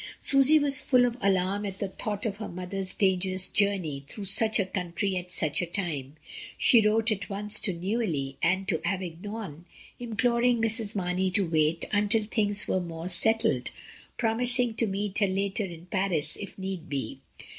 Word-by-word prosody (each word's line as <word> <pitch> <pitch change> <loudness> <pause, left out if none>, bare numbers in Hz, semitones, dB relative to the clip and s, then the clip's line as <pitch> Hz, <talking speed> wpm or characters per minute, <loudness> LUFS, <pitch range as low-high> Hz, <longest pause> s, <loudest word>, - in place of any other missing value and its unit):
Susy 275 +2 +4
was 285 -3 +1
full 250 -2 +4
of 240 -1 -1
alarm 195 +1 +1
at 195 -2 -5
the 200 - -2
thought 205 +2 -4
of 205 -3 -2
her 215 - -5
mother's 185 +1 -2
dangerous 185 -1 +2
journey 185 -9 -1
through 205 +5 -8
such 220 +3 +3
a 200 - +2
country 185 +1 -2
at 180 0 -5
such 155 -1 0
a - - -1
time. 155 -7 -4 0.4
She 235 - +5
wrote 220 +2 +2
at 205 0 -3
once 205 +1 +2
to 195 - -1
Neuilly 170 -7 -2
and 190 +3 +1
to 165 -6 -1
Avignon, 185 -2 -5 0.3
imploring 240 +1 +1
Mrs. 225 -1 +1
Mamey 185 0 0
to 195 +1 +1
wait 160 0 +1
until 210 +1 +2
things 210 -1 0
were 185 - 0
more 170 0 -6
settled, 190 - +3 0.5
promising 240 +1 +1
to 225 +1 0
meet 200 0 -2
her 200 - +3
later 195 +2 -1
in 170 -2 -10
Paris 185 -4 0
if 200 - -8
need 190 -4 -5
be. 140 -2 -4
195 Hz, 170 wpm, -27 LUFS, 180-220 Hz, 0.5 s, She